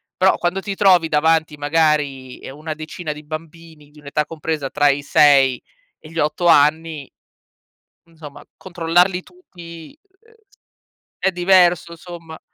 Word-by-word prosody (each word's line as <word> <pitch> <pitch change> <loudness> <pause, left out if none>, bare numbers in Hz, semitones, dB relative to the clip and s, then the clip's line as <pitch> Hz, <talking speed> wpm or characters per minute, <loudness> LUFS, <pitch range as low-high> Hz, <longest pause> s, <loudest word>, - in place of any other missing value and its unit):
Però, 190 +1 +3
quando 180 +2 -2
ti 195 +1 -5
trovi 185 -5 +3
davanti, 155 0 +1
magari, 145 -4 -1
e - - -10
una 155 +3 -7
decina 155 +1 -7
di 150 0 -12
bambini, 155 0 -10
di 150 +1 -19
un'età 150 +1 -3
compresa 155 -2 -4
tra 145 +1 +2
i 140 0 0
6 140 -3 +4 0.4
e 155 - -15
gli 165 - -10
8 150 +3 -1
anni 155 -1 +2 0.9
insomma 160 -4 -13
controllarli 175 +1 0
tutti, 170 - -14 0.2
ehm, 455 0 -25 0.9
è 190 - +1
diverso, 175 -1 +2
somma. 165 -2 -11
160 Hz, 135 wpm, -19 LUFS, 150-175 Hz, 0.9 s, 6